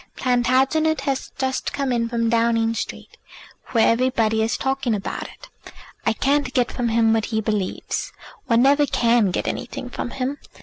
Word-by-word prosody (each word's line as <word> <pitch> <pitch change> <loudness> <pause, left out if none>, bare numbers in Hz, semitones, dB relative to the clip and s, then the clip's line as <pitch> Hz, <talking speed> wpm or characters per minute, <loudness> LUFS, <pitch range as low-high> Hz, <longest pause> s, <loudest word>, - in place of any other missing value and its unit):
Plantagenet 260 +5 +2
has 270 -2 -2
just 265 0 -2
come 275 -2 -1
in 230 -1 0
from 230 -1 0
Downing 230 0 +2
Street, 230 - -6 0.5
where 230 -3 +3
everybody 230 -2 +2
is 220 +1 0
talking 265 -4 0
about 200 - -5
it. - - -15 0.6
I 225 - +4
can't 275 +2 0
get 250 -1 +2
from 240 -2 -1
him 225 0 +3
what 225 -1 +1
he 220 -1 -1
believes. 210 -3 -2 0.4
One 230 +1 +4
never 285 +2 +4
can 235 -5 +3
get 180 - -2
anything 250 0 -5
from - - -4
him. 270 +3 -3
240 Hz, 165 wpm, -22 LUFS, 225-265 Hz, 0.6 s, I